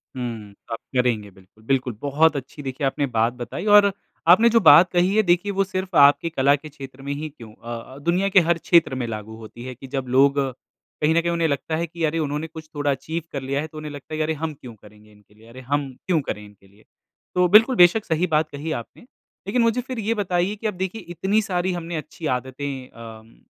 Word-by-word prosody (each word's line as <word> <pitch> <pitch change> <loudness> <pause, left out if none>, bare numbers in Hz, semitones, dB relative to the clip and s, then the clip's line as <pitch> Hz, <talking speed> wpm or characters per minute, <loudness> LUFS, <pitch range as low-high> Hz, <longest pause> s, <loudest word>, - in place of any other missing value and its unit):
हुँ, 115 -5 -6 0.2
आप 115 - -3 0.2
करेंगे 110 -5 0
बिल्कुल। 95 +4 -22
बिल्कुल, 130 -1 0
बहुत 145 +2 +3
अच्छी 140 +2 -7
देखिए 135 +2 -3
आपने 140 +1 -1
बात 115 +2 +2
बताई 125 - -6
और 200 -1 +7 0.4
आपने 220 +7 +7
जो 230 0 +4
बात 165 0 +7
कही 180 +3 +2
है 220 - +5
देखिए 180 +3 +2
वो 195 0 +1
सिर्फ 185 -1 -5
आपके 145 +3 +5
कला 140 -2 +3
के 150 +2 -10
क्षेत्र 135 -2 -11
में 140 +1 -4
ही 155 +2 -5
क्यों 115 -7 -13
अ 120 +1 -7 0.2
अ, - - -11
दुनिया 180 +6 +1
के 190 - +6
हर 170 -1 +3
क्षेत्र 165 -5 +3
में 125 -2 -2
लागू 110 0 -6
होती 115 +2 -11
है, 130 -1 -7
कि 135 +2 -11
जब 135 -1 -4
लोग 140 +3 +4 0.6
कहीं 155 +2 +3
न 170 - +4
कहीं 170 0 -1
उन्हें 170 -1 +1
लगता 155 +2 -2
है 170 - -1
कि 170 0 -6
अरे! 160 +1 +1
उन्होंने 150 +1 -2
कुछ 155 -1 -11
थोड़ा 145 -1 0
अचीव 155 +5 -4
कर 140 - -4
लिया 140 +2 -2
है, 155 - -5
तो 155 - -13
उन्हें 155 -1 -6
लगता 145 +2 -10
है - - -2
कि - - -1
अरे! 160 +1 -1
हम 155 0 -4
क्यों 125 -4 -12
करेंगे 105 +1 -19
इनके 105 0 -23
लिए 110 +2 -20
अरे! 130 +2 -11
हम 140 +2 -1 0.2
क्यों 170 -4 +2
करें 105 -5 -5
इनके 100 -1 -19
लिए? 100 +2 -24 0.5
तो 180 0 +4
बिल्कुल, 225 +7 +6
बेशक 180 +5 +5
सही 165 +2 0
बात 155 0 +1
कही 150 +3 -5
आपने, 115 - -13 0.5
लेकिन 235 +4 +1
मुझे 230 +2 +2
फिर 255 -1 -6
ये 220 +2 0
बताइए 185 -1 -1
कि 215 +1 -4
अब 210 - -2
देखिए 190 +4 -4
इतनी 200 +5 +1
सारी 185 -3 -1
हमने 170 -1 -5
अच्छी 155 +1 -8
आदतें 130 0 -6
अम, 115 -1 -12
150 Hz, 235 wpm, -23 LUFS, 130-175 Hz, 0.6 s, और